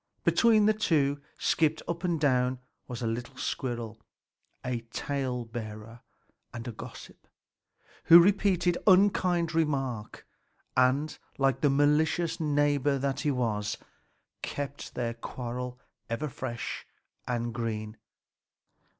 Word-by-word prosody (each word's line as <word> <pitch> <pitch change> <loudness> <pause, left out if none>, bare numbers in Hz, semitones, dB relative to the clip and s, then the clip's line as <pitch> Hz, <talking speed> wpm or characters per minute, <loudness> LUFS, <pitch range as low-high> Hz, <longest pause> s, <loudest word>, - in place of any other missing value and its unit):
Between 220 -3 +5
the 215 - +5
two 145 -9 +1 0.2
skipped 160 -1 +1
up 170 +1 -3
and 170 -3 0
down 130 -3 +2 0.3
a 120 -1 -4
little 120 +4 -4
squirrel, 115 -5 -3 0.6
a 125 -1 -1
tale 130 -1 -2
bearer 115 0 -8 0.5
and 120 +1 -7
a - - -3
gossip, 115 +2 -11 0.8
who 170 - +10
repeated 180 -2 +3
each - - -10
unkind 180 -3 +4
remark 135 -9 -1 0.5
and, 135 +4 +2 0.2
like 135 -1 +2
the 145 - +4
malicious 150 +4 +2
neighbor 145 -2 +2
that 135 0 -1
he 150 - 0
was, 110 -6 -1 0.6
kept 145 0 -5
their 120 -1 -1
quarrel 125 +1 -6 0.3
ever 140 +6 -2
fresh 120 -2 -5 0.4
and 120 -1 -2
green. 110 -2 -3
135 Hz, 115 wpm, -29 LUFS, 120-155 Hz, 0.8 s, who